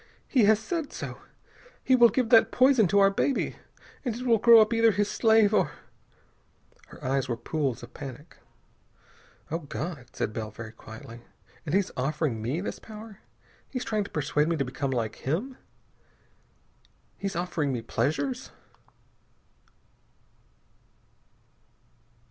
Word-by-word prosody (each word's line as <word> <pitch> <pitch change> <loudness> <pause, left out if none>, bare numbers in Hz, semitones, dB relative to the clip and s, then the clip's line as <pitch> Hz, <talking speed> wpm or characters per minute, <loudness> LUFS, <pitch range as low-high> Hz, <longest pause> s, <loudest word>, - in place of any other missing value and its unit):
He 245 -6 +4
has 215 +1 +5
said 315 - -4
so.... - - -7 0.6
He 260 - +4
will 240 -2 +7
give 235 +2 0
that 225 -1 +6
poison 255 -5 +5
to 200 - +1
our 195 0 +6
baby.... 265 +7 -1 0.5
And 245 -5 -2
it 250 +2 -6
will 230 -3 +4
grow 230 +1 +8
up 215 +1 +4
either 230 0 +5
his 205 0 0
slave, 220 -2 +4
or - - +2 0.6
" - - -32
Her 145 - -12
eyes 135 0 0
were 120 - -1
pools 135 0 -2
of 120 - -11
panic. 145 +3 -9 1.1
"Oh, 165 - -1
God!" 150 -3 -6
said 105 - -2
Bell 110 -1 -4
very 110 +1 -9
quietly. 115 +1 -11 0.5
"And 150 - 0
he's 200 -1 +1
offering 135 -3 -1
me 130 +10 -2
this 200 - -5
power! 215 -1 -11 0.5
He's 255 -2 -4
trying 215 -2 -1
to - - -9
persuade 150 0 0
me 170 - +1
to 140 -3 -1
become 135 +2 -3
like 115 -4 -2
him. 200 - -3 1.6
He's 195 -2 -4
offering 165 -5 -1
me 120 -3 -3
pleasures!" 140 +2 -2
175 Hz, 145 wpm, -27 LUFS, 135-225 Hz, 1.6 s, grow